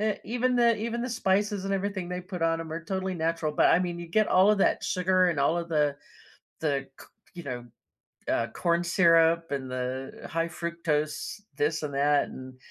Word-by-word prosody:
E 215 0 +2
even 245 +3 0
the 235 -2 +4
even 235 +2 -3
the 250 - -3
spices 205 -2 0
and 195 0 0
everything 195 -2 -3
they 180 0 -3
put 180 -1 -7
on 165 0 +1
'em 160 -1 -7
are 165 +1 -5
totally 190 0 -2
natural, 165 -1 -1
but, - - +4
I 175 - +3
mean, 175 -1 -3
you 170 - -7
get 215 +6 +2
all 190 +2 +5
of 210 - +2
that - - +2
sugar 185 0 +2
and 155 -5 -1
all 160 +5 +2
of 170 0 -4
the 150 -3 +1 0.6
the 140 -3 -1
c - - -12 0.3
you 175 -2 -8
know, 125 -3 -5 0.6
uh, - - +1
corn 170 0 +1
syrup 165 -2 +4
and 135 -2 -3
the 130 +1 -5
high 165 +1 0
fructose 165 0 -3 0.2
this 155 +1 0
and 145 -2 -4
that, 145 +1 +2
and, 130 0 -10
170 Hz, 205 wpm, -27 LUFS, 150-190 Hz, 0.6 s, all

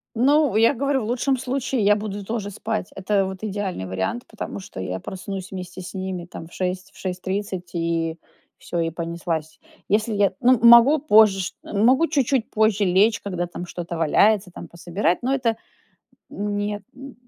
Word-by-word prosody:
Ну, 280 0 +3
я 230 +5 +5
говорю, 275 +1 0
в - - -4
лучшем 250 +4 0
случае 255 -2 -1
я 205 +1 +6
буду 205 -1 -5
тоже 210 -1 -3
спать. 215 -1 -3
Это 195 +1 +1
вот 190 0 -6
идеальный 195 - -3
вариант, 95 - -3
потому 220 - -6
что 190 - -9
я 95 0 -3
проснусь 190 - -7
вместе 185 0 -7
с 180 - -9
ними 185 -2 -4
там 170 -2 -10
в - - -22
6, 185 0 -3
в - - -18
6:30, 185 0 -4
и 165 -1 -1 0.4
всё, 170 - -3
и 165 0 0
понеслась. 165 -1 -4 0.3
Если 215 +2 +1
я 200 -2 +2
ну, 250 0 +5
могу 235 +6 +8
позже 215 -8 +5
ш 180 - -3
могу 255 +10 +3
чуть-чуть 270 -4 +1
позже 215 -1 +2
лечь, 200 +4 +3
когда 180 -3 -3
там 175 +1 -7
что-то 170 -1 -6
валяется, 190 +5 +3
там 170 - -9
пособирать, 175 +3 -1
но 255 +2 0
это 245 -5 +1 0.7
Нет, 205 0 -3
нь 270 0 -11
200 Hz, 175 wpm, -23 LUFS, 180-225 Hz, 0.7 s, могу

